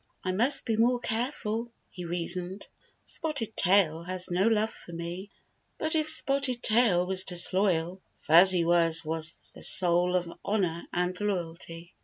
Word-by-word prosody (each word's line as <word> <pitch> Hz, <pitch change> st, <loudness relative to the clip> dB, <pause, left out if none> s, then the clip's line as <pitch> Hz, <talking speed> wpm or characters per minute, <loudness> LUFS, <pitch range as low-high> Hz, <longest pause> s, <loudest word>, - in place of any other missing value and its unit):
" -, -, -43 dB
I 185 Hz, -, -1 dB
must 235 Hz, +10 st, +2 dB
be 225 Hz, -3 st, -1 dB
more 240 Hz, +2 st, +2 dB
careful," 230 Hz, -1 st, -3 dB, 0.2 s
he 180 Hz, -2 st, -8 dB
reasoned. 175 Hz, +2 st, -3 dB, 0.2 s
" -, -, -42 dB
Spotted 285 Hz, -9 st, -4 dB
Tail 175 Hz, -4 st, +3 dB
has 180 Hz, +1 st, -5 dB
no 185 Hz, +4 st, +1 dB
love 220 Hz, 0 st, +1 dB
for -, -, -12 dB
me." 170 Hz, +4 st, -7 dB, 0.5 s
But 315 Hz, 0 st, 0 dB
if 310 Hz, -1 st, +3 dB
Spotted 275 Hz, -5 st, +1 dB
Tail 215 Hz, -6 st, +3 dB
was 190 Hz, 0 st, +1 dB
disloyal, 180 Hz, 0 st, 0 dB, 0.2 s
Fuzzy 175 Hz, +2 st, +4 dB
Wuzz 165 Hz, -1 st, +3 dB
was 160 Hz, +1 st, -3 dB
the -, -, -13 dB
soul 180 Hz, 0 st, +3 dB
of 180 Hz, -1 st, -1 dB, 0.2 s
honor 180 Hz, -5 st, -2 dB
and 180 Hz, +1 st, -2 dB
loyalty. 170 Hz, -3 st, -5 dB
185 Hz, 155 wpm, -27 LUFS, 175-220 Hz, 0.5 s, Fuzzy